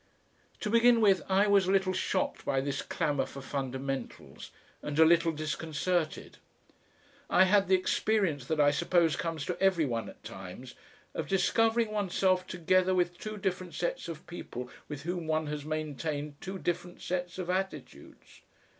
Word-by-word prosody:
To 210 - -2
begin 235 0 +6
with, 200 -4 +4
I 195 +2 +4
was 200 -2 +4
a - - +2
little 190 -1 +2
shocked 280 +9 -1
by 135 - +1
this 140 +1 -2
clamour 150 -4 -1
for 140 - -9
fundamentals 135 0 -5 0.3
and 145 0 -4
a 160 - +8
little 170 0 +4
disconcerted. 155 +2 -2 0.9
I 185 - +6
had 195 +1 +4
the 190 - +5
experience 185 - +1
that 160 -1 -1
I 145 -1 +6
suppose 165 +1 +2
comes 165 -2 -3
to 180 - -4
every 190 -5 +3
one 115 -4 -2
at - - -15
times 95 +7 -9 0.4
of - - -3
discovering 225 +4 +2
oneself 185 -2 +1
together 185 +1 +2
with 175 -1 0
two 215 0 -5
different 185 -2 -3
sets 175 - -2
of 160 -2 -7
people 125 -8 -7 0.2
with 145 -1 -6
whom 175 0 -3
one 155 0 +1
has 150 -1 -4
maintained 150 -1 -4
two 190 +1 -5
different 175 0 -3
sets 180 0 -3
of 180 -1 -2
attitudes. 190 +1 -6
175 Hz, 160 wpm, -30 LUFS, 150-190 Hz, 0.9 s, a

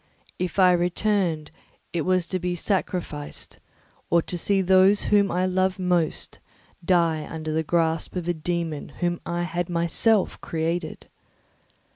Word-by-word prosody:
If 180 0 -3
I 185 -2 +6
returned, 175 -2 0 0.4
it 170 - 0
was 185 +1 +1
to 185 +1 -3
be 180 0 -2
sacrificed 175 -5 -3 0.5
or 170 -1 +3
to - - -4
see 195 +2 +1
those 190 +2 +5
whom 200 -1 +3
I 180 +1 0
most 185 +1 0
loved 165 -3 -1 0.4
die 165 -3 +2
under 155 -1 -5
the 160 - +1
grasp 165 +1 0
of 175 -2 -3
a 175 - +2
dæmon 165 -2 -3
whom 175 0 0
I 175 0 -1
had 175 0 -3
myself 175 +5 +2
created. 165 0 -3
175 Hz, 140 wpm, -25 LUFS, 165-185 Hz, 0.5 s, I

